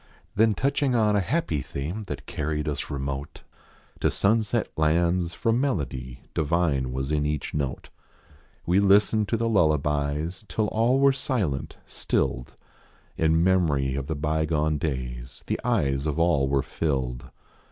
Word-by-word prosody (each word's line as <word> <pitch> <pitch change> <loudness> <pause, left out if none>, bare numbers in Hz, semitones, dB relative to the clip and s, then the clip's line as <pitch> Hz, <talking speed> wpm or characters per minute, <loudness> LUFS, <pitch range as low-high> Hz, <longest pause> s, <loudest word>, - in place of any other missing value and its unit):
Then 110 0 +3
touching 140 -1 +1
on 105 -2 +3
a - - +4
happy 95 - -1
theme 80 - -5
That - - -6
carried 75 0 -3
us 75 -2 -3
remote. 70 0 -5 0.6
To - - +2
sunset 110 +1 +1
lands, 85 +2 +1
for 115 - +1
melody 70 - -2
Divine 75 -5 +1
was 65 +2 -3
in 75 -1 +1
each 75 -1 -2
note. 70 -3 -3 0.8
We 90 +3 +3
listened 105 +2 +4
to 115 - 0
the 115 +1 0
lullabies 75 -2 +1
Till 110 - 0
all 115 +4 +2
were 140 0 +5
silent, 105 - -2
stilled. - - -2 0.6
In 80 +1 +2
memory 80 -8 +2
of 70 0 -3
the 80 - -2
bygone 75 0 0
days, 65 -5 -4
The - - -2
eyes 75 - +1
of 75 0 -2
all 80 -5 +2
were 70 -1 +2
filled. 65 -6 -2
80 Hz, 140 wpm, -26 LUFS, 70-100 Hz, 0.8 s, were